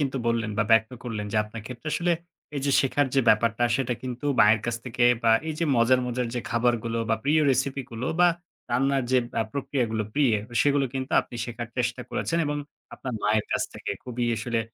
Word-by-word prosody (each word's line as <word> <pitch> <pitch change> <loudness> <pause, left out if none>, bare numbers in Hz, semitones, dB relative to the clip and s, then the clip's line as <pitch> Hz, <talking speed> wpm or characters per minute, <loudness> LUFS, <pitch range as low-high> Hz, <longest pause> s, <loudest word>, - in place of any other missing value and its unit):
কিন্তু 135 -2 -1
বললেন 115 -2 0
বা 105 - +3
ব্যক্ত 110 +1 +4
করলেন 110 -4 -4
যে 110 - 0
আপনার 105 +1 -9
ক্ষেত্রে 125 +4 -7
আসলে 175 0 +1 0.4
এই - - -1
যে - - +2
শেখার 140 +1 +1
যে 135 - +5
ব্যাপারটা 115 +2 +3
সেটা 125 -2 -1
কিন্তু 130 +2 -5
মায়ের 105 +1 +6
কাছ 120 -1 -1
থেকে 120 -1 0 0.2
বা 115 - +4 0.2
এই 155 - -2
যে 170 - +1
মজার, 120 +2 +4
মজার 125 0 -1
যে 120 - -1
খাবারগুলো 115 -1 0
বা - - +5
প্রিয় 155 +2 +3
recipe 135 +1 0
গুলো 115 +2 -4
বা 175 - +7 0.4
রান্নার 135 +2 +1
যে 130 - +6 0.2
অ্যা - - +2
প্রক্রিয়াগুলো 130 -5 -1
প্রিয়ে, 140 -6 +3 0.3
সেগুলো 145 -1 +3
কিন্তু 130 +2 -4
আপনি 120 - -10
শেখার 120 -1 -6
চেষ্টা 125 0 -1
করেছেন 165 - -1
এবং 145 0 -1 0.4
আপনার 130 - -6
মায়ের 105 +1 +2
কাছ - - +1
থেকে। - - -5
খুবই 125 -1 -3
আসলে 115 +1 -1
120 Hz, 200 wpm, -26 LUFS, 115-135 Hz, 0.4 s, বা